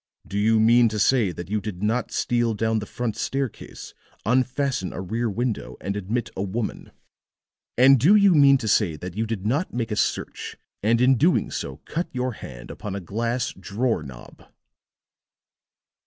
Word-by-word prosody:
Do 100 - -3
you 110 +1 +3
mean 115 +1 +5
to 110 - -4
say 110 -2 +3
that 85 0 -7
you 105 -1 0
did 95 -2 -6
not 115 +4 0
steal 120 -2 0
down 110 +1 0
the 105 - -7
front 120 -3 -3
staircase, 135 -3 -4 0.3
unfasten 130 -2 0
a - - -6
rear 110 +5 -2
window, 120 +2 -3
and 100 +3 -4
admit 105 +4 -3
a - - -3
woman? 105 +3 -4 0.9
And 130 +2 +7
do 170 - +6
you 200 -3 +6
mean 140 -3 +6
to 115 - -5
say 100 -6 +2
that 90 +3 -8
you 110 +1 -1
did 105 -3 -4
not 140 +6 -1
make 115 -2 -2
a - - 0
search, - - -2 0.2
and 115 +3 +2
in 130 0 +5
doing 165 +8 +2
so - - -5
cut 170 +2 -3
your 125 0 -2
hand - - -10
upon 100 -2 -6
a - - -3
glass 115 +7 -2
drawer 110 -2 -1
knob?" 65 -5 -12
115 Hz, 175 wpm, -24 LUFS, 100-125 Hz, 0.9 s, And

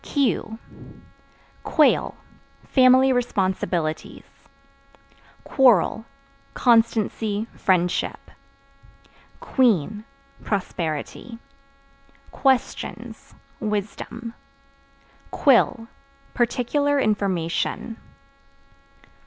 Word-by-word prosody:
Q 250 -5 -1 1.0
Quail 305 -3 +2 0.5
Family 260 0 +5
responsibilities. 185 -8 -2 1.2
Quarrel 230 - +3 0.5
Constancy, 225 -3 +1
friendship. 180 -2 0 1.2
Queen 215 - +1 0.4
Prosperity. 180 - -4 0.9
Questions 265 -3 -2 0.2
Wisdom. 215 +2 -5 1.0
Quill 240 -4 +2 0.5
Particular 275 +4 0
information. 200 0 -1
225 Hz, 45 wpm, -23 LUFS, 195-250 Hz, 1.2 s, Family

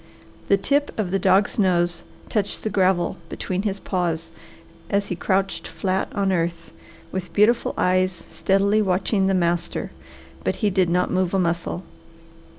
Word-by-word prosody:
The 200 - +4
tip 285 +8 0
of 200 -5 -1
the 195 - +1
dog's 190 +4 +3
nose 175 -3 +2 0.3
touched 205 -2 -1
the 215 - -2
gravel 185 -2 +2
between 185 0 -3
his 200 -1 -2
paws 170 -4 -2 0.6
as 200 0 +1
he 180 - -1
crouched 195 +2 -1
flat 190 0 -2
on 195 -1 +1
earth, 170 -2 -2 0.4
with 185 -1 -4
beautiful 220 +3 +3
eyes 185 -1 +1
steadily 200 +2 +2
watching 190 +1 +1
the 195 - +2
master, 175 -1 -1 0.5
but - - 0
he 205 - +3
did 185 -2 +2
not 180 +1 +1
move 185 0 +1
a - - +3
muscle. 170 0 -1
190 Hz, 155 wpm, -23 LUFS, 175-200 Hz, 0.6 s, The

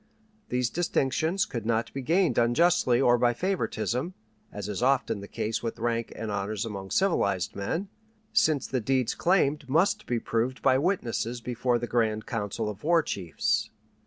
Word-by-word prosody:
These 125 -1 0
distinctions 170 +3 0
could 120 - -5
not 115 +1 -1
be 135 - -4
gained 170 +5 +2
unjustly 125 0 +3
or 120 -2 +4
by 120 0 +3
favoritism, 175 - -2 0.4
as 105 -1 -6
is 105 0 -4
often 125 -4 +2
the 100 - -8
case 110 +2 -2
with 115 -1 -4
rank 115 0 -1
and 110 -2 -4
honors 100 +1 -2
among 100 -3 -6
civilized 100 - +1
men, 160 - -2 0.5
since 160 - +3
the 130 -2 -2
deeds 130 +1 +1
claimed 150 -6 +1
must 185 +8 +2
be 120 -1 0
proved 115 +4 -2
by 130 -1 +4
witnesses 125 - -1
before 120 +1 0
the 120 - -3
grand 110 -3 0
council 105 -1 -3
of 105 0 -6
war 165 +1 +4
chiefs. 90 - -1
120 Hz, 160 wpm, -27 LUFS, 110-155 Hz, 0.5 s, or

